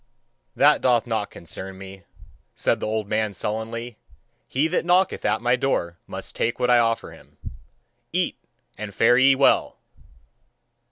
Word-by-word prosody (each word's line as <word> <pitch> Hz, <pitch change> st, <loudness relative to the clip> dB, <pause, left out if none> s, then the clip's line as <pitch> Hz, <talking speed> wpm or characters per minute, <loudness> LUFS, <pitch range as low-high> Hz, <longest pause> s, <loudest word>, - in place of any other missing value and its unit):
"That 145 Hz, +1 st, +4 dB
doth 120 Hz, -3 st, +3 dB
not 110 Hz, -3 st, -2 dB
concern 95 Hz, +3 st, -9 dB
me," 95 Hz, -1 st, -11 dB, 0.5 s
said -, -, +1 dB
the -, -, -3 dB
old 110 Hz, -1 st, -2 dB
man 110 Hz, 0 st, -1 dB
sullenly; 110 Hz, +3 st, -4 dB, 0.5 s
"he 140 Hz, +5 st, +1 dB
that 170 Hz, -, 0 dB
knocketh 180 Hz, +2 st, +2 dB
at -, -, 0 dB
my 120 Hz, +1 st, +3 dB
door 85 Hz, -10 st, -1 dB
must -, -, -8 dB
take 120 Hz, +2 st, -1 dB
what 125 Hz, 0 st, +2 dB
I 120 Hz, -, +6 dB
offer 115 Hz, -1 st, 0 dB
him. -, -, -18 dB, 0.7 s
Eat, -, -, 0 dB, 0.4 s
and 105 Hz, -1 st, -6 dB
fare 120 Hz, +2 st, +4 dB
ye 135 Hz, +1 st, +6 dB
well!" 135 Hz, -, +2 dB
115 Hz, 150 wpm, -23 LUFS, 105-130 Hz, 0.7 s, I